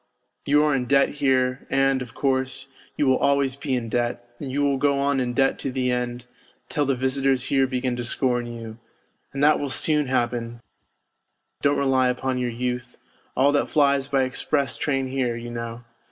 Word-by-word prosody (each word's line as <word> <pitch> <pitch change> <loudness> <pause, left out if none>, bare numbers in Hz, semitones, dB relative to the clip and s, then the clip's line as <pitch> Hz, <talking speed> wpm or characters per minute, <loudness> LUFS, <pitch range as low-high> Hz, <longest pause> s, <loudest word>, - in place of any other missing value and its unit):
You 150 +1 +4
are 150 -1 +2
in 130 -2 0
debt 140 +2 +4
here, 130 -2 0
and, 135 -1 +2
of 125 -3 -8
course, 135 0 -1 0.3
you 145 - +2
will 130 -1 +3
always 140 -2 +2
be 140 -1 -2
in 120 -2 -2
debt, 120 +1 -2
and 135 -3 -5
you 145 +2 0
will 140 -1 +2
go 140 +1 +2
on 140 0 +1
in 125 -1 -1
debt 135 +1 +2
to 135 - -3
the 125 -1 0
end, 125 0 -3 0.4
till 145 -2 0
the 135 - +2
visitors 130 0 +1
here 135 -1 +4
begin 125 -1 -1
to 120 - -3
scorn 120 0 0
you. 115 -1 -8 0.5
And 140 +1 -2
that 150 +1 +5
will 145 - -3
soon 150 +2 +1
happen, 120 -2 -1 1.0
don't 145 0 +2
rely 130 -2 +2
upon 130 +1 -1
your 125 -1 -1
youth 125 +1 -4 0.4
all 135 +2 +5
that 145 - +1
flies 140 -2 +2
by 135 -1 +2
express 135 +2 -1
train 135 -3 -1
here, 130 -2 -1
you 120 0 -7
know. 115 0 -6
130 Hz, 190 wpm, -24 LUFS, 125-140 Hz, 1.0 s, that